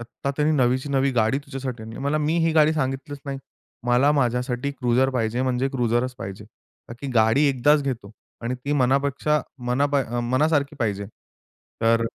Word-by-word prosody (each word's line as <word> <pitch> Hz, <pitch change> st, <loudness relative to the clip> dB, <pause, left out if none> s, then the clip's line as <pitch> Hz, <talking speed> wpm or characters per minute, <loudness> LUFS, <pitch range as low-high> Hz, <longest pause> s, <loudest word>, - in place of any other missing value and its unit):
आता 120 Hz, +4 st, -5 dB
त्यांनी 150 Hz, +1 st, +2 dB
नवीची 130 Hz, +1 st, +1 dB
नवी 135 Hz, 0 st, +2 dB
गाडी 115 Hz, +2 st, +2 dB
तुझ्यासाठी 135 Hz, -4 st, -6 dB
आणली. 110 Hz, 0 st, -9 dB
मला 140 Hz, +3 st, 0 dB
मी 155 Hz, +2 st, 0 dB
ही 165 Hz, -, +2 dB
गाडी 155 Hz, -1 st, +5 dB
सांगितलीच 140 Hz, -1 st, -3 dB
नाही. 135 Hz, -1 st, -3 dB, 0.5 s
मला 125 Hz, +4 st, +4 dB
माझ्यासाठी 125 Hz, 0 st, 0 dB
क्रुझर 130 Hz, 0 st, +1 dB
पाहिजे 120 Hz, -1 st, -1 dB
म्हणजे 130 Hz, +1 st, 0 dB
क्रुझरच 125 Hz, -1 st, 0 dB
पाहिजे. 95 Hz, +2 st, -7 dB, 0.4 s
का -, -, -7 dB
की 140 Hz, -, -5 dB
गाडी 110 Hz, +5 st, +4 dB
एकदाच 145 Hz, +3 st, +3 dB
घेतो 125 Hz, -7 st, -4 dB, 0.3 s
आणि 120 Hz, +2 st, -2 dB
ती 145 Hz, -, -1 dB
मनापेक्षा 140 Hz, +2 st, +2 dB, 0.3 s
मना 125 Hz, +4 st, +2 dB
पा 145 Hz, -1 st, +1 dB
अ, 120 Hz, +1 st, -3 dB
मनासारखी 140 Hz, +4 st, +1 dB
पाहिजे. 100 Hz, -4 st, -1 dB, 0.7 s
तर 115 Hz, 0 st, +3 dB
130 Hz, 170 wpm, -24 LUFS, 120-140 Hz, 0.7 s, गाडी